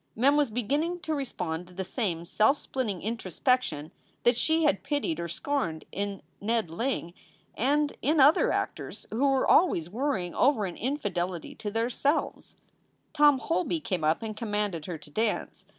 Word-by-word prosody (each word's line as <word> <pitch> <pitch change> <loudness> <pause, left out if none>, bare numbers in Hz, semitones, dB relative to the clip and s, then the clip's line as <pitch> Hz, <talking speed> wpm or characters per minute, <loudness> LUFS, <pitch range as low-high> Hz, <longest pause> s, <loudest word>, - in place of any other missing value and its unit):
Mem 270 +6 +4
was 295 -3 +3
beginning 285 +10 -1
to 315 -4 -2
respond 180 - -3
to 180 - -16
the 190 - -2
same 180 -5 -2
self 220 - +3
splitting 220 -12 -3
introspection 210 - -1 0.3
that 240 +1 +5
she 320 +6 +2
had 200 -10 +3
pitied 280 - -1
or 170 - -3
scorned 170 - -2
in 200 -3 -4 0.2
Ned 220 -4 0
Ling 175 -3 -2 0.4
and 290 +5 +1
in 305 +2 +2
other 285 +4 +6
actors - - -3
who 255 +6 +2
were 270 -1 +2
always 175 - +4
worrying 215 -7 -1
over 250 -6 +3
an 180 - -5
infidelity 185 - -2
to 210 - -5
their 225 +3 -1
Selves. 285 +5 -1 0.6
Tom 295 -2 +6
Holby 335 +3 -1
came 185 - -3
up 155 +8 +2
and 215 -1 -4
commanded 205 -7 -2
her 175 -3 -4
to 150 -1 -14
dance. 220 +5 -2
225 Hz, 165 wpm, -28 LUFS, 180-280 Hz, 0.6 s, other